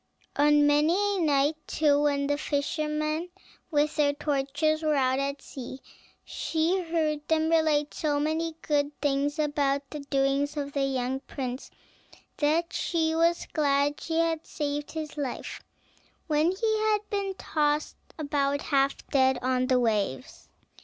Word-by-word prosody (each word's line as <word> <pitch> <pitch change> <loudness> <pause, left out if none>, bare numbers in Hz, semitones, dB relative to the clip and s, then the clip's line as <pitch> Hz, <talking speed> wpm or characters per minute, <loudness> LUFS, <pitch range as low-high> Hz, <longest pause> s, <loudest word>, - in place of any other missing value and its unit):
On 295 0 +5
many 295 +3 +4
a 405 -1 +1
night, 295 0 +2
too, 290 -2 +2
when 285 -1 +1
the 290 +1 +1
fishermen, 305 +2 -1 0.4
with 300 -1 +1
their 290 -1 +3
torches, 295 +2 0
were 310 -1 +1
out 260 -1 +2
at 275 0 -3
sea, 260 0 -8 0.5
she 330 +4 0
heard 315 -3 -1
them 320 0 +2
relate 310 -3 +2
so 295 -2 0
many 315 +2 -1
good 290 -1 0
things 285 +1 0
about 285 -2 0
the 300 - -5
doings 280 +1 0
of 285 -1 -3
the 275 -1 +1
young 260 -1 -1
prince, 260 -2 -6 0.7
that 320 +3 +1
she 320 -2 0
was 335 +1 +2
glad 285 -1 +1
she 325 -1 -2
had 330 -1 +1
saved 290 -1 -3
his 310 -1 -5
life 275 -4 -4 0.6
when 310 +1 +2
he 435 +3 0
had 425 -1 +1
been 395 -2 -2
tossed 300 -3 0 0.2
about 285 -2 0
half 275 -1 +1
dead 265 -1 +3
on 255 0 +1
the 255 -1 +3
waves. 205 - -2
295 Hz, 145 wpm, -27 LUFS, 280-320 Hz, 0.7 s, On